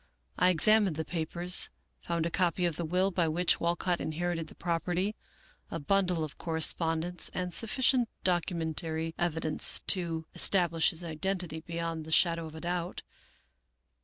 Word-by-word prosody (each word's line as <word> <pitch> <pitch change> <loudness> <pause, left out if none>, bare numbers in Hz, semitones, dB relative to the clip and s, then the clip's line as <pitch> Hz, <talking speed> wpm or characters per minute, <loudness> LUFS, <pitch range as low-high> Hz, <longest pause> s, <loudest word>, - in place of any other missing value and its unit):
I 180 - +4
examined 200 +1 +4
the 160 +1 -3
papers, 175 +2 +1 0.3
found 170 -1 -2
a 170 - -2
copy 180 -1 +1
of 170 -3 -1
the 170 - -3
will 185 +4 +1
by 175 -2 +1
which 170 +3 +1
Walcott 175 +1 0
inherited 165 +1 -2
the - - -14
property, 175 +4 -1 0.5
a 165 - -4
bundle 180 +1 +1
of 150 -3 -7
correspondence, 165 +1 0
and 180 -1 -3
sufficient 245 +2 +2
documentary 165 -2 0
evidence 160 -2 +1
to 165 -4 +2
establish 170 -4 +2
his 170 +1 -5
identity 170 0 -3
beyond 165 -1 -4
the 160 - -9
shadow 165 0 +3
of 155 - -11
a 160 - -8
doubt. 175 0 -3
170 Hz, 145 wpm, -30 LUFS, 160-180 Hz, 0.5 s, I